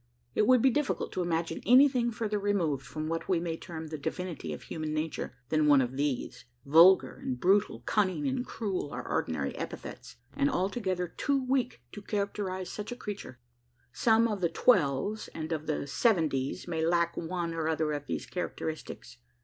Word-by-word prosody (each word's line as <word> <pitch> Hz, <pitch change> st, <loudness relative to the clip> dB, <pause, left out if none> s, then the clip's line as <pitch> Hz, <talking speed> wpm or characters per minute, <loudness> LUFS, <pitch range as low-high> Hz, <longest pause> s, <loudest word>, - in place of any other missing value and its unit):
It 210 Hz, -, +2 dB
would 255 Hz, -2 st, +5 dB
be 265 Hz, -, +6 dB
difficult 295 Hz, 0 st, -1 dB
to 185 Hz, -, -2 dB
imagine 165 Hz, -1 st, -1 dB
anything 255 Hz, -1 st, +5 dB
further 215 Hz, -2 st, -2 dB
removed, 175 Hz, -9 st, 0 dB
from 155 Hz, +6 st, -5 dB
what 165 Hz, +3 st, -3 dB
we 180 Hz, -3 st, +3 dB
may 165 Hz, -1 st, -2 dB
term 160 Hz, -1 st, -7 dB
the 155 Hz, -1 st, -5 dB
"divinity 165 Hz, -, -4 dB
of 75 Hz, -, -6 dB
human 155 Hz, -1 st, -4 dB
nature," 155 Hz, -4 st, -3 dB
than 155 Hz, -1 st, +2 dB
one 145 Hz, -2 st, +7 dB
of 130 Hz, 0 st, -1 dB
these. 140 Hz, -3 st, -2 dB, 0.2 s
Vulgar 165 Hz, 0 st, +6 dB
and 125 Hz, -1 st, -3 dB
brutal, 195 Hz, +6 st, +2 dB
cunning 210 Hz, +6 st, +1 dB
and 260 Hz, -2 st, -1 dB
cruel, 200 Hz, -, -3 dB
are -, -, -6 dB
ordinary 75 Hz, -3 st, -1 dB
epithets; -, -, -7 dB, 0.2 s
and 140 Hz, -, +2 dB
altogether 185 Hz, -2 st, -1 dB
too 270 Hz, +9 st, -1 dB
weak 255 Hz, -1 st, 0 dB
to 205 Hz, -, -8 dB
characterise 200 Hz, -2 st, -3 dB
such 210 Hz, +3 st, -6 dB
a -, -, -3 dB
creature. 205 Hz, -, -7 dB, 0.6 s
Some 225 Hz, -, +4 dB
of 210 Hz, -4 st, -3 dB
the 170 Hz, -, +2 dB
"twelves" 180 Hz, -, +2 dB
and 160 Hz, 0 st, -5 dB
of 155 Hz, -1 st, -3 dB
the 155 Hz, -, -1 dB
"seventies" 155 Hz, -, +1 dB
may 160 Hz, -2 st, -1 dB
lack 170 Hz, 0 st, +2 dB
one 170 Hz, 0 st, -3 dB
or 160 Hz, -1 st, -2 dB
other 160 Hz, -1 st, 0 dB
of 145 Hz, -1 st, -4 dB
these -, -, -3 dB
characteristics. 160 Hz, -7 st, -5 dB
175 Hz, 175 wpm, -30 LUFS, 155-210 Hz, 0.6 s, one